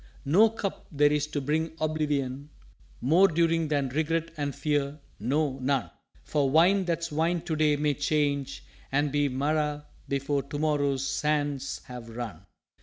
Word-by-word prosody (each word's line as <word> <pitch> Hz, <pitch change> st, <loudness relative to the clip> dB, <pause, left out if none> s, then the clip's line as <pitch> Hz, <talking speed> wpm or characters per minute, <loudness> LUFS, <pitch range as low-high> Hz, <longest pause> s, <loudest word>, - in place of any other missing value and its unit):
_" -, -, -24 dB, 0.2 s
"No 195 Hz, +11 st, +6 dB
Cup 215 Hz, -3 st, -5 dB
there 145 Hz, -1 st, +4 dB
is 150 Hz, 0 st, 0 dB
to 150 Hz, -, -3 dB
bring 155 Hz, +4 st, -1 dB
oblivion 145 Hz, -3 st, -1 dB, 0.5 s
More 165 Hz, +10 st, +5 dB
during 165 Hz, -1 st, +2 dB
than 145 Hz, -3 st, 0 dB
Regret 160 Hz, +4 st, -1 dB
and 145 Hz, -3 st, -3 dB
Fear 145 Hz, -1 st, -1 dB, 0.2 s
no, 135 Hz, +4 st, 0 dB
none! 135 Hz, 0 st, 0 dB, 0.3 s
For 145 Hz, -3 st, +1 dB
Wine 180 Hz, +6 st, +4 dB
that's 170 Hz, -1 st, -2 dB
Wine 165 Hz, +3 st, +1 dB
to 160 Hz, -, -3 dB
day 155 Hz, -1 st, +3 dB
may 145 Hz, 0 st, +1 dB
change 145 Hz, -1 st, -1 dB, 0.3 s
and 145 Hz, +1 st, +1 dB
be 145 Hz, 0 st, +2 dB
Marah 150 Hz, +2 st, -1 dB, 0.2 s
before 140 Hz, +1 st, 0 dB
to 140 Hz, +2 st, -6 dB
morrow's 145 Hz, -3 st, +1 dB
Sands 145 Hz, 0 st, -1 dB
have 125 Hz, -2 st, -9 dB
run." 110 Hz, -6 st, -7 dB
145 Hz, 155 wpm, -28 LUFS, 140-155 Hz, 0.5 s, No